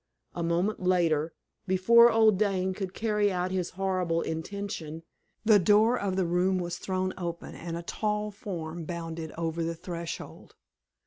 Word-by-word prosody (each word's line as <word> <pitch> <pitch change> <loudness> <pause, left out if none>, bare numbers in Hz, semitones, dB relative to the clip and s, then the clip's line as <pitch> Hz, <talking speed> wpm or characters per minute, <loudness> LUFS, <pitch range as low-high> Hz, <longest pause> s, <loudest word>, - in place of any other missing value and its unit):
A 175 - -4
moment 170 +6 0
later, 170 -4 +2 0.4
before 235 +6 +6
old 220 -3 +4
Dane 190 -3 +1
could 190 -1 -5
carry 210 -2 +1
out 180 0 -1
his 185 -2 -1
horrible 185 -3 0
intention, 165 -2 -5 0.4
the 215 -2 +7
door 210 +5 +4
of 200 -5 -1
the 190 -1 +1
room 180 +2 +2
was 175 -1 -3
thrown 185 0 -2
open, 170 -1 -5
and 170 0 -5
a 170 - -6
tall 210 +3 -2
form 170 -5 -6
bounded 165 -1 -5
over 165 0 -2
the 165 0 -2
threshold. 170 0 -7
185 Hz, 150 wpm, -28 LUFS, 170-200 Hz, 0.4 s, the